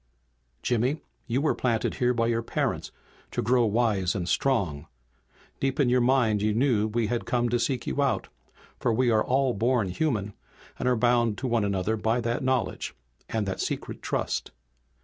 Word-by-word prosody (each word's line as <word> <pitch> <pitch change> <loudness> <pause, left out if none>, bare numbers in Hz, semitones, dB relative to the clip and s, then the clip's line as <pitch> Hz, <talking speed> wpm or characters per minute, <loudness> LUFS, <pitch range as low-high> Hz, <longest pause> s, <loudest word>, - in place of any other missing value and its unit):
"Jimmy, 125 +5 +1 0.3
you 125 +2 0
were 155 - +2
planted 115 -3 0
here 125 0 +4
by 115 -2 +1
your 115 0 +1
parents 115 - -2 0.4
to - - -2
grow 120 0 +3
wise 105 -5 +1
and 90 -3 -2
strong. 90 - 0 0.7
Deep 135 +2 -1
in 135 -4 +4
your 125 0 +3
mind 120 -5 +3
you 105 0 +1
knew 115 -4 +2
that 105 - -11
we 120 -1 +2
had 120 +2 -2
come 120 -1 +1
to 120 +1 +1
seek 125 0 -1
you 145 - -1
out, 140 -1 0 0.5
for - - +1
we 120 +2 +2
are 110 -1 +3
all 130 0 +2
born 115 -1 +1
human, 105 - -1 0.5
and 125 - +1
are 125 - +3
bound 120 -2 +2
one 120 -3 +1
to 100 - +1
another 100 +3 0
by 110 +3 +1
that 120 +3 -1
knowledge, 130 -2 -1 0.3
and 110 -2 -1
that 95 - -2
secret - - -4
trust. - - -2
120 Hz, 185 wpm, -27 LUFS, 110-125 Hz, 0.7 s, here